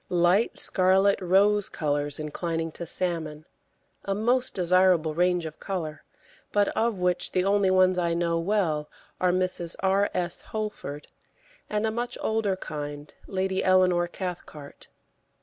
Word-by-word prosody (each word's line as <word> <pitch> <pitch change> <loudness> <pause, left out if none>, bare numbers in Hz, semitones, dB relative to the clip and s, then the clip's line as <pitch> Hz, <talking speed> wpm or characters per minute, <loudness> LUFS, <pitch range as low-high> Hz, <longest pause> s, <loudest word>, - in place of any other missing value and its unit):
Light 180 +5 +2
scarlet 195 +1 +3
rose 200 +3 +3
colours 145 -1 -2
inclining 165 +2 -3
to 170 +2 -8
salmon, 160 -4 +2 0.6
a 195 - -2
most 245 +4 0
desirable 180 -3 +3
range 180 +1 +1
of 155 -1 -8
colour, 165 -6 -5 0.5
but 205 -1 +2
of 225 -2 -1
which 180 -1 -1
the 185 0 +1
only 200 -1 +2
ones 185 -1 +3
I 170 -1 0
know 170 -1 0
well 165 -5 -1 0.3
are 180 -1 +2
Mrs. 180 -2 0
R. 195 +1 +2
S. 175 -1 -1
Holford, 210 -9 -6 0.6
and 210 +1 -1
a 220 - 0
much 240 +2 -4
older 220 -3 0
kind, 145 -3 -7
Lady 190 0 -1
Eleanor 185 -2 +3
Cathcart. 170 -6 -8
180 Hz, 135 wpm, -26 LUFS, 165-195 Hz, 0.6 s, scarlet